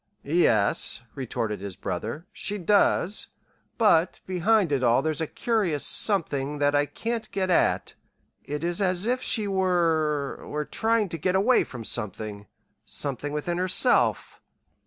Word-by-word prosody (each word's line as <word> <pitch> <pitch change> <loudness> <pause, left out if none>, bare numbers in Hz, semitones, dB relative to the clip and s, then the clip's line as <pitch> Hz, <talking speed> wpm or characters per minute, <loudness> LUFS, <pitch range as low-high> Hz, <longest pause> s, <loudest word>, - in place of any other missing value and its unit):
"Yes," 120 - +2
retorted 115 -6 -4
his 100 -2 -7
brother, 160 +4 -5
"she 205 - -3
does; 200 +1 +1 0.5
but 185 -7 +3
behind 190 0 +1
it 140 -2 +1
all 120 +2 +3
there's 155 -1 -2
a 160 - -1
curious 200 - 0
something 150 -8 +4
that 145 0 +1
I 145 0 +2
can't 230 - -4
get 190 -1 -2
at. 175 - +1 0.5
It 150 +2 -5
is 175 +2 -1
as 185 0 0
if 250 +2 0
she 215 -3 -1
were 165 -7 0
were 150 0 -3
trying 225 +2 0
to 165 - -4
get 180 +4 0
away 220 +7 +3
from 120 -3 -9
something 105 -2 -2 0.4
something 145 +1 -4
within 170 +4 -3
herself." 185 +7 +2
165 Hz, 140 wpm, -25 LUFS, 140-195 Hz, 0.5 s, something